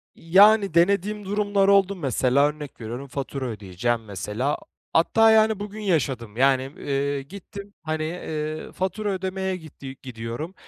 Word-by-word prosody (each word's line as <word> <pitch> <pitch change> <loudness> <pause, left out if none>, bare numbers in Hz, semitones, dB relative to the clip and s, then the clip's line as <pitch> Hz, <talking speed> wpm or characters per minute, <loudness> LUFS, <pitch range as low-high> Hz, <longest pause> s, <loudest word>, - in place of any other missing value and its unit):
Yani, 200 +2 +5
denediğim 200 +4 +2
durumlar 205 0 +1
oldu, 200 0 +4
mesela 140 - +2
örnek 150 -4 -7
veriyorum 120 +5 -6
fatura 135 0 -4
ödeyeceğim, 110 +1 -2
mesela. 105 +8 -2 0.4
Hatta, 225 +7 +5
yani, 220 -1 +4
bugün 210 +1 -6
yaşadım, 130 - -1
yani, 135 0 +4
eee, 140 0 -1
gittim, 200 +6 -10
hani, 155 -1 -2
eee, 155 -2 -4
fatura 190 +3 -2
ödemeye 190 0 -2
gitti 145 -5 -10
gidiyorum. 120 +7 -6
155 Hz, 130 wpm, -24 LUFS, 130-195 Hz, 0.4 s, Yani